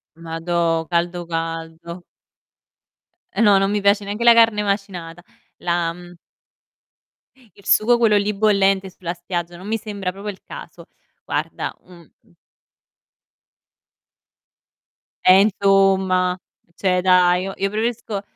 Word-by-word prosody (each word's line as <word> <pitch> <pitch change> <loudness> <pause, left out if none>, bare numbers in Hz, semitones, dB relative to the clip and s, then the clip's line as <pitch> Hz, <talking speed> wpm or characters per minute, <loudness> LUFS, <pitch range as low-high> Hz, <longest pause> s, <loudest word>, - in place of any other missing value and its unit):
Madò, 165 0 -2
caldo, 175 0 -1
caldo. 165 +1 -5 1.3
E - - +2
no, 205 -3 +6
non 195 0 +1
mi 210 -1 -1
piace 200 +1 +3
neanche 205 +4 -4
la 235 -1 +8
carne 225 -2 +4
macinata. 185 -4 -4 0.4
La, 170 -1 -1
mhmm 175 0 -13 1.4
il 200 - -20
sugo 240 +3 +4
quello 220 -3 +3
lì 205 +1 0
bollente 195 -2 +2
sulla 175 -1 -6
spiaggia 175 0 -5
non 190 +3 -11
mi 225 +1 -1
sembra 200 -4 -5
proprio 200 +2 -7
il 195 - -9
caso. - - -11 0.4
Guarda, - - -4
mhmm, 170 -4 -17
mh - - -30 3.0
E 185 +1 +7
insomma, 190 -3 +2 0.4
cioè 180 -2 0
dai, 180 0 +4
io 195 - -5
io 195 +1 -1
preferisco 220 -1 -3
190 Hz, 120 wpm, -20 LUFS, 175-205 Hz, 3.0 s, la